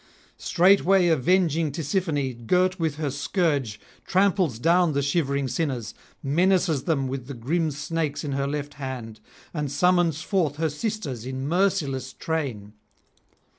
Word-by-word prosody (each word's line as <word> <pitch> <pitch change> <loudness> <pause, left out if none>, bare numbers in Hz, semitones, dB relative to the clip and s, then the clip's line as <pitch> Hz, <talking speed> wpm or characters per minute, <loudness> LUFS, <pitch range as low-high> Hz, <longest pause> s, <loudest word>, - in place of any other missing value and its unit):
Straightway 185 0 +4
avenging 165 0 +2
Tisiphone, 145 - -2
girt 185 - +2
with 160 -3 0
her 150 -2 -2
scourge, 140 - -1 0.3
tramples 185 - +2
down 170 +4 +3
the 140 - +1
shivering 140 -2 0
sinners, 125 -5 -2 0.3
menaces 165 0 +2
them 140 -6 0
with 130 -1 -5
the 140 - -6
grim 155 +8 0
snakes 150 0 -3
in 145 - -3
her 140 0 -1
left 145 0 -4
hand, 125 -6 -6 0.3
and 150 -4 -3
summons 175 -1 +2
forth 170 -8 0
her 160 +1 0
sisters 150 - -4
in 130 +1 -4
merciless 155 -7 0
train. 130 -11 -4
150 Hz, 130 wpm, -25 LUFS, 135-175 Hz, 0.3 s, Straightway